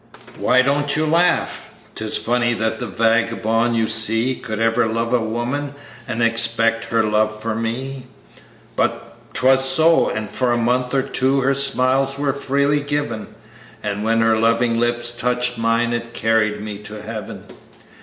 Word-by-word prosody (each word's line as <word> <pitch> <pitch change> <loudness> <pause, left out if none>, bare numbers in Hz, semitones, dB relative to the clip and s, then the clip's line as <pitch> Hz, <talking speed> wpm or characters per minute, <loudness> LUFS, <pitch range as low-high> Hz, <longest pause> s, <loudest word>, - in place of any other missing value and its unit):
"Why 130 +1 +3
don't 145 +1 +1
you 155 +1 0
laugh? 170 +3 0 0.2
'Tis 110 -1 -1
funny 120 0 0
that 110 0 -2
the 125 - -4
vagabond 115 +2 0
you 115 -1 +1
see 110 +3 +4
Could 115 -4 -6
ever 115 +1 +1
love 115 +2 -2
a 125 - +3
woman, 120 +6 -4 0.3
and 115 - -2
expect 115 0 +1
her 115 -1 0
love 105 0 0
for 115 +1 -3
me; 125 +4 -5 0.7
But - - -2 0.2
'twas 130 +1 +4
so, 160 +5 +4
and 110 -1 -4
for 125 +4 -1
a - - 0
month 125 +2 0
or 135 - +1
two, 135 0 +1
her 135 +1 +1
smiles 135 0 +1
were 140 -1 -1
freely 140 +1 0
given, 145 -7 -4 0.5
And 105 0 -3
when 115 +1 +1
her 115 0 +2
loving 115 +1 +1
lips 120 0 +2
touched 125 0 0
mine, 115 +1 0
it 120 0 -5
carried 105 -2 0
me 105 -1 -7
to 105 0 -9
Heaven. 110 -1 -8
120 Hz, 160 wpm, -19 LUFS, 115-130 Hz, 0.7 s, see